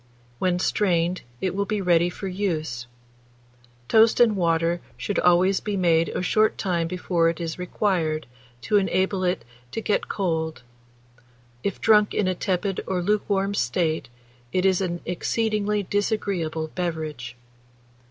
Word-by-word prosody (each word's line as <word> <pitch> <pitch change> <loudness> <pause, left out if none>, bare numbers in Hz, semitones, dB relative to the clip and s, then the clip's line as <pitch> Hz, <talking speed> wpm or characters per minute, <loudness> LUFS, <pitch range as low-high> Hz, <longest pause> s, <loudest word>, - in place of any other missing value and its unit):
When 180 -1 +1
strained, 180 -2 +1 0.2
it 185 - 0
will 200 +1 -1
be 215 -1 -1
ready 175 -2 +3
for 195 +2 -6
use. 160 -11 -2 1.0
Toast 225 0 +5
and 230 -3 +5
water 170 -1 +1 0.2
should 205 - -2
always 180 +2 +4
be 205 -2 -3
made 170 -2 +3
a - - -3
short 215 +4 +2
time 175 -4 0
before 175 -1 +1
it 165 - -4
is 165 0 -4
required, 175 -4 0 0.4
to 210 - +2
enable 190 0 +1
it 180 -9 0 0.3
to - - -2
get 215 -2 -1
cold: 160 -7 -2 1.0
if 200 - -3
drunk 210 -2 +4
in 200 - +1
a 185 - +2
tepid 190 +1 -1
or 180 -2 -1
lukewarm 200 0 +1
state, 155 -1 0 0.4
it 185 0 +1
is 190 -1 +3
an 175 -2 -2
exceedingly 210 +3 0
disagreeable 190 -6 -1
beverage. 155 -9 -4
180 Hz, 140 wpm, -24 LUFS, 165-200 Hz, 1.0 s, Toast